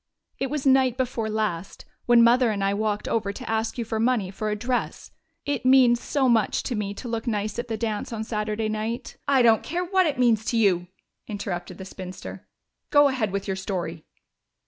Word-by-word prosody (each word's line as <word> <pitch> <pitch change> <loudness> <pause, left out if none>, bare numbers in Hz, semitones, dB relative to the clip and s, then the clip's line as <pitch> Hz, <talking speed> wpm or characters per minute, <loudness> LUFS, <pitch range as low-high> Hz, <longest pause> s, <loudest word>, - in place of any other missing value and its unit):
It 270 - -1
was 290 -1 -3
night 260 -2 +4
before 240 -4 -2
last, 210 -4 -3 0.2
when 240 -1 +7
Mother 240 +1 +5
and 200 -2 -1
I 195 0 +2
walked 210 0 -1
over 205 -3 0
to - - -9
ask 220 +1 -1
you 235 - -2
for 220 0 -3
money 225 -5 +1
for 215 +2 -3
a 210 - 0
dress. 245 +4 -3 0.3
It 285 -3 -2
means 255 -2 +5
so 275 -3 +1
much 225 -4 +2
to 250 - -3
me 205 -2 -3
to 245 - -7
look 230 +1 -3
nice 215 0 -2
at 240 - -4
the 225 -2 -3
dance 215 -1 -3
on 220 -1 -3
Saturday 215 0 -2
night 215 +2 -4
" - - -46
"I 255 - +5
don't 225 -2 +5
care 350 +3 -3
what 375 -1 +2
it 290 - -2
means 235 -4 +3
to 235 - 0
you," 185 -5 +2 0.4
interrupted 200 -4 -5
the 190 - -8
spinster. 185 -1 -9 0.4
"Go 290 -1 +6
ahead 240 -7 -1
with 200 0 -3
your 195 - -2
story." 175 -4 -4
220 Hz, 210 wpm, -25 LUFS, 205-250 Hz, 0.4 s, when